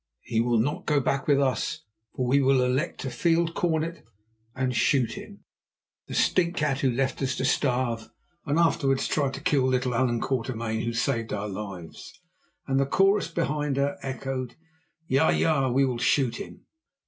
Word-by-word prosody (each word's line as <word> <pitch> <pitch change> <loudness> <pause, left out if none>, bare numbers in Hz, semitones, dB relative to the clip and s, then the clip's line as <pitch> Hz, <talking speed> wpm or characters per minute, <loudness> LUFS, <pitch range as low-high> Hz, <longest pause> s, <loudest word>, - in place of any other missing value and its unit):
"He 115 -2 0
will 120 0 +2
not 130 +7 -1
go 150 -1 +3
back 135 0 -1
with 140 -2 +4
us, 140 +3 0 0.3
for 130 - -1
we 135 +3 +3
will 135 -1 +4
elect 130 +4 -1
a 130 - -3
field 170 +2 +1
cornet 165 -1 -1 0.5
and 130 -1 -1
shoot 130 -1 +2
him—the - - -14
stinkcat, 155 -6 +1
who 135 - +2
left 130 +3 -1
us 130 -1 0
to 130 - -2
starve 125 -4 0 0.3
and 145 0 0
afterwards 140 -5 +2
tried 140 -3 0
to 135 - -8
kill 145 -6 +2
little 130 -1 0
Allan 120 -1 +1
Quatermain, 115 -3 -2
who 115 - -2
saved 115 -1 -1
our 105 0 -2
lives"; 95 -5 -8 0.5
and 135 0 +1
the 135 - +1
chorus 195 +6 +3
behind 150 -4 -1
her 140 +1 0
echoed: 130 -2 -4 0.5
"Ja, 135 +5 +3
ja, 140 -5 +2
we 135 +3 +3
will 125 -3 -2
shoot 125 -1 +2
him." - - -10
135 Hz, 165 wpm, -26 LUFS, 125-145 Hz, 0.5 s, with